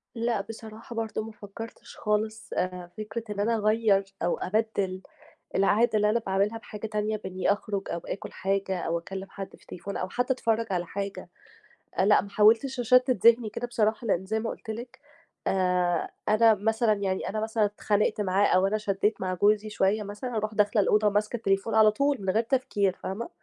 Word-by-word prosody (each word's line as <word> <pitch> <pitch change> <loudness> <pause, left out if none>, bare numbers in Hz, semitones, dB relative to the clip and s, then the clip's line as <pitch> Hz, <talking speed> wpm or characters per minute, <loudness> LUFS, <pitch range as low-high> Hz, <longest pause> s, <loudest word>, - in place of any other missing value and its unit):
لأ، 230 -2 0
بصراحة 225 +2 -10
برضه 225 -1 -2
ما 225 - -8
فكَّرتش 215 +2 -10
خالص. 215 +1 -1
آآ 180 -1 -3
فكرة 215 +2 -5
إن 200 - -7
أنا 225 +3 +2
أغيَّر 215 -2 +3 0.2
أو 175 - +1
أبَدِّل 200 -2 -1 0.5
العادة 205 +4 +3
اللي 210 0 +3
أنا 235 - +2
باعملها 200 +3 +1
بحاجة 215 -1 -7
تانية 215 0 -1
بإنّي 190 -2 0
أخرُج 205 -1 -3
أو 170 - -2
آكُل 185 - -6
حاجة 195 -1 -1
أو 170 +1 -1
أكلِّم 190 +3 -7
حد 195 -1 -8
في - - -26
التليفون 200 +3 -7
أو 185 - -2
حتّى 245 +6 0
أتفرّج 230 -3 0
على 175 -2 -1
حاجة، 200 +1 -5 0.8
لأ، 205 +2 +5
ما 200 - -9
حاولتش 225 +6 +4
أشتِّت 250 +2 +4
ذِهني 230 -1 +6
كده 245 +3 -4
بصراحة 220 0 0
لإن 190 -2 +1
زي 220 +3 -1
ما 225 - -2
قُلت - - -8
لِك 235 +3 -6 0.5
آآ 180 -2 +1 0.2
أنا 225 +1 +6
مثلًا 220 +2 +2
يعني 195 -2 -2
أنا 215 - -2
مثلًا 220 0 +1
اتخانقت 210 +1 0
معاه 195 +1 +3
أو 185 +1 +3
أنا 215 - 0
شدّيت 205 0 0
مع 185 -1 -1
جوزي 210 +3 +2
شوية 210 +1 +1
مثلًا 210 +5 -6
أروح 215 0 -2
داخلة 210 0 +3
الأوضة 210 +1 +3
ماسكة 210 +3 0
التليفون 195 +1 0
على 215 -1 +7
طول 280 +5 +1
من 190 - -2
غير 225 +4 +2
تفكير 205 -7 0
فاهمة، 215 +5 -4
210 Hz, 185 wpm, -27 LUFS, 195-225 Hz, 0.8 s, على